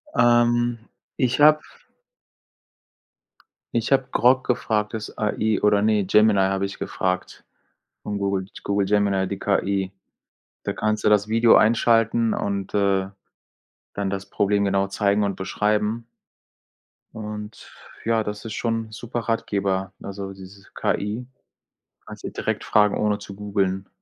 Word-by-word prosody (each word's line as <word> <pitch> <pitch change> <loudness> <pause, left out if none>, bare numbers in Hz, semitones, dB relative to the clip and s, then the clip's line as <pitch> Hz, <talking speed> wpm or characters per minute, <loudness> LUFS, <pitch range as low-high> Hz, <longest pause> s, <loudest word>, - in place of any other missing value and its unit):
Ähm, 120 0 +3 0.4
ich 130 0 +1
habe 155 +1 +7 2.1
ich 115 +2 -1
habe 135 -1 +3
Grok 130 +2 +3
gefragt, 110 -4 0
das 105 -1 -6
AI 110 0 0
oder 105 -1 +4
nein, 105 -3 +2
Gemini 105 -1 +4
habe 95 0 +1
ich 100 - -7
gefragt 90 -1 -3 0.6
von 105 - -3
Google 100 -1 -1 0.2
Google 100 -1 0
Gemini, 100 -2 +2
die 100 0 -4
KI. 100 -1 0 0.7
Da - - -2
kannst 110 0 -1
du - - +4
das 105 0 +3
Video 115 +1 +5
einschalten 115 0 +3
und, 100 -1 -3
äh, 100 -2 +2 0.9
dann 100 -1 -2
das 100 0 -4
Problem 100 0 +1
genau 100 0 +1
zeigen 100 +1 +1
und 100 - -2
beschreiben. 105 +3 -1 1.1
Und, 105 0 -8 0.3
ja, 115 -1 +2
das 105 +2 -6
ist 110 - -5
schon 115 -1 -2
super 120 +2 -5
Ratgeber, 100 -4 -1
also 100 0 -6
dieses 95 +1 -13
KI. 105 +5 -2 0.8
Kannst - - -11
du - - -5
direkt - - -3
fragen, 105 -1 +3
ohne 105 -1 0
zu 100 -1 -10
googeln. 100 -2 -1
105 Hz, 130 wpm, -23 LUFS, 100-115 Hz, 2.1 s, habe